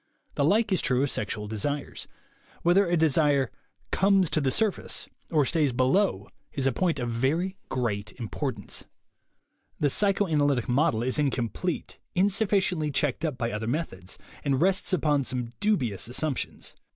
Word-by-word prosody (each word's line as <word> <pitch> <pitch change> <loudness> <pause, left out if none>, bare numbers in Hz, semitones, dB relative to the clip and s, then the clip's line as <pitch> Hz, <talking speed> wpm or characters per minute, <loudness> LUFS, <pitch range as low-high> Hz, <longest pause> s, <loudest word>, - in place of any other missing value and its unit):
The - - 0
like 210 +7 +3
is 190 - +2
true 125 +1 +1
of 145 - 0
sexual 105 0 -3
desires. 140 +7 -3 0.6
Whether 180 +3 +4
a 175 0 +2
desire 145 -4 +3 0.4
"comes 195 -3 +3
to 155 - +1
the 135 - +1
surface" 210 +8 0 0.2
or 150 -4 +3
stays 150 -2 +2
below 130 - +2 0.3
is 135 - -1
a 135 - +4
point 175 +5 0
of 120 - -2
very 155 +11 0
great 110 -5 -2
importance. 115 -4 -5 0.9
The 145 -2 +2
psychoanalytic 155 - +2
method 125 -2 +2
is 130 +4 0
incomplete, 140 +5 -2 0.2
insuf 200 +3 +2
ficiently 180 -6 +1
checked 140 +1 0
up 150 -6 -1
by 115 0 -1
other 105 +1 -3
methods, 115 - -4 0.3
and 135 -2 +1
rests 190 +5 +2
upon 150 -5 +2
some 125 -2 -3
dubious 130 - 0
assumptions. 135 +2 -2
145 Hz, 150 wpm, -27 LUFS, 125-180 Hz, 0.9 s, Whether